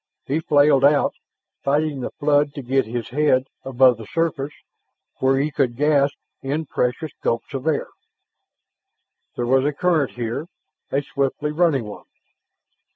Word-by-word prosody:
He 145 +4 0
flailed 145 -3 +4
out, 145 0 +4 0.5
fighting 145 0 0
the - - -3
flood 145 0 +1
to 140 - -6
get 130 -1 +1
his 120 -1 -4
head 135 -1 +2 0.2
above 130 -2 +4
the 110 -2 -10
surface 160 -4 -1 0.7
where 135 0 +3
he 145 +3 0
could 125 -3 0
gasp 145 0 +2 0.3
in 145 +4 -2
precious 130 +2 -2
gulps 115 +4 -2
of 135 +2 -4
air. 155 -3 0 1.5
There 120 - -2
was 130 +2 +3
a 145 - +1
current 155 -2 +1
here, 120 +6 -4 0.4
a 140 +1 0
swiftly 140 +2 -2
running 155 -5 +2
one. 105 -1 -10
140 Hz, 145 wpm, -22 LUFS, 130-150 Hz, 1.5 s, flailed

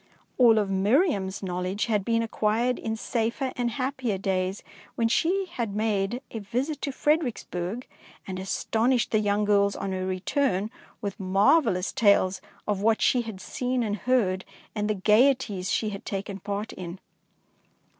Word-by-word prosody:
All 235 -3 +7
of 210 -2 +2
Miriam's 200 - +1
knowledge 185 +2 -2
had 210 -4 +1
been 230 +2 +1
acquired 225 +2 0
in 220 0 -2
safer 235 +4 -1
and 245 -1 0
hap 260 +3 -2
pier 235 -7 -1
days, 190 0 -1 0.3
when 230 - +2
she 370 +11 +1
had 235 - -4
made 215 +3 0
a 225 - -4
visit 250 +9 -3
to 280 - -2
Fredericksburg, 245 - -1 0.4
and 185 -1 -5
astonished 230 +6 0
the 215 - +3
young 205 0 +1
girls 200 -1 +3
on 195 - -3
her 185 0 -2
return 200 +2 0 0.3
with 200 -3 -4
marvel 205 - +4
lous 180 +1 -2
tales 195 -3 +3 0.3
of 205 -2 0
what 220 +1 +3
she 250 - +3
had 220 -5 -7
seen 250 +4 -2
and 210 -2 -1
heard, 205 -7 +1 0.3
and 210 -1 -1
the 215 - +1
gaieties 210 -2 +3
she 215 - 0
had 200 -1 -7
taken 200 0 -4
part 205 +3 -4
in. 180 0 -7
215 Hz, 160 wpm, -26 LUFS, 195-245 Hz, 0.4 s, All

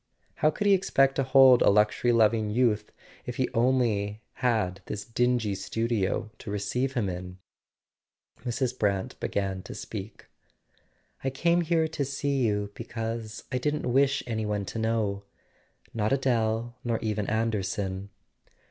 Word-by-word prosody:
How 155 - +4
could 205 - -3
he 200 - +6
expect 135 -8 +3
to 135 - +2
hold 130 -1 +7
a - - +6
luxury 105 +4 +3
loving 110 -2 +3
youth 110 -2 +1 0.4
if - - -4
he - - +1
had - - -1
only 115 -4 +1 0.6
this 105 - -5
dingy 120 -3 +1
studio 110 +1 -1
to - - -8
receive 115 +6 -1
him 120 -6 0
in? 90 0 -6 1.1
Mrs. 125 0 -2
Brant 100 -2 -1
began 95 -2 -2
to - - -9
speak. 105 0 -7 1.0
"I 135 - +1
came 170 +6 +2
here 165 -1 +2
to 150 -2 -2
see 140 +1 -1
you 105 -3 0
because 115 -1 -5
I 130 - 0
didn't 150 -2 -1
wish 135 +1 +3
any 110 -2 -2
one 105 -1 -1
to 115 - -5
know; 110 -3 0 0.7
not 110 0 0
Adele, 120 -3 0
nor 115 -2 0
even 105 -2 -1
Anderson." 100 -3 -1
115 Hz, 145 wpm, -27 LUFS, 105-130 Hz, 1.1 s, hold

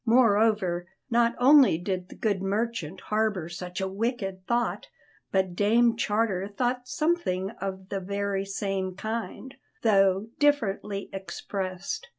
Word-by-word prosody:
Moreover, 215 -7 +3 0.2
not 235 0 +3
only 265 - +6
did 180 +1 -3
the - - -11
good 205 -4 0
merchant 195 -3 -2
harbour 210 -6 0
such 180 +1 -6
a 190 - -1
wicked 195 -2 -3
thought, 235 -5 0 0.4
but 190 -2 +1
Dame 230 +4 +4
Charter 210 -4 0
thought 245 +4 -2
something 250 - 0
of 190 0 -5
the 195 - -2
very 200 +1 -2
same 195 -1 -3
kind, 230 +5 -5 0.3
though 195 -1 +3
differently 210 -8 +1
expressed. 190 - -4
200 Hz, 125 wpm, -27 LUFS, 190-230 Hz, 0.4 s, only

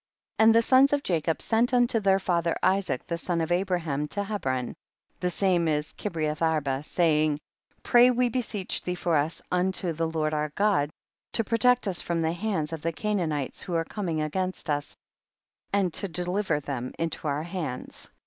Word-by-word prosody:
63. - - +6
And 225 0 +6
the 230 - +6
sons 265 +4 +5
of 285 -1 +1
Jacob 165 -2 0
sent 240 +3 +2
unto 240 -2 +3
their 195 -2 +3
father 170 -3 0
Isaac 190 -9 +1
the 170 -1 -3
son 170 0 -1
of 165 +1 -2
Abraham 175 -6 0
to 200 +7 -3
Hebron, 135 - -2 0.4
the 180 - -1
saine 180 -2 +1
is 150 -1 -1
Kireath 155 -6 -3
arba, 150 -5 +1
saying, 155 -1 +2 0.5
64. - - -12
Pray 245 0 +8
we 250 0 +2
beseech 225 -6 -2
thee 180 - -3
for 175 -2 0
us 150 +3 0
unto 180 -1 +1
the 165 +1 -1
Lord 155 -1 -1
our 150 0 -1
God, 200 -8 +2 0.4
to 225 - +4
pro 230 +2 -1
tect 250 +2 +4
us 185 -3 0
from 170 -1 -1
the 160 +1 +1
hands 170 -5 -2
of 160 - -5
the 165 - -1
Ca 210 - -4
naanites 155 -8 -2
who 175 - -4
are 165 0 +1
coming 170 -7 -3
against 185 +1 -2
us, 145 0 -3 0.7
and 195 -4 +1
to 200 - 0
deliver 180 -1 -1
them 130 -3 -5
into 165 -1 -3
our 145 +1 -1
hands. 170 -7 -5
175 Hz, 190 wpm, -27 LUFS, 155-200 Hz, 0.7 s, Pray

